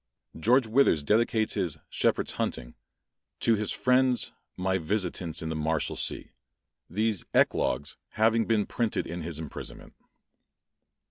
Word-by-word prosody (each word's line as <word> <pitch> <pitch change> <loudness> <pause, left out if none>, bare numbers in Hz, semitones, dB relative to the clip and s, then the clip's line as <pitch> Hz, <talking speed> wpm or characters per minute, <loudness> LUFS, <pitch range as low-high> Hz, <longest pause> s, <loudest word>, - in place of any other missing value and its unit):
George 120 +9 +3
Withers 110 - +3
dedicates 110 +4 +2
his 85 -6 -1
"Shepherds - - 0
Hunting," - - -3 0.7
"To 115 - +4
his 105 -1 0
friends, 125 -1 +2 0.3
my 95 +1 0
visitants 85 -2 -2
in 80 - -3
the 80 - -2
Marshalsea:" 80 -1 -2 0.6
these 105 +1 0
"eclogues" 75 - +1 0.2
having 115 +1 +3
been 110 -3 +2
printed 115 -2 -1
in 85 +1 -5
his 80 -1 -5
imprisonment. 80 -3 -8
100 Hz, 120 wpm, -28 LUFS, 80-115 Hz, 0.7 s, To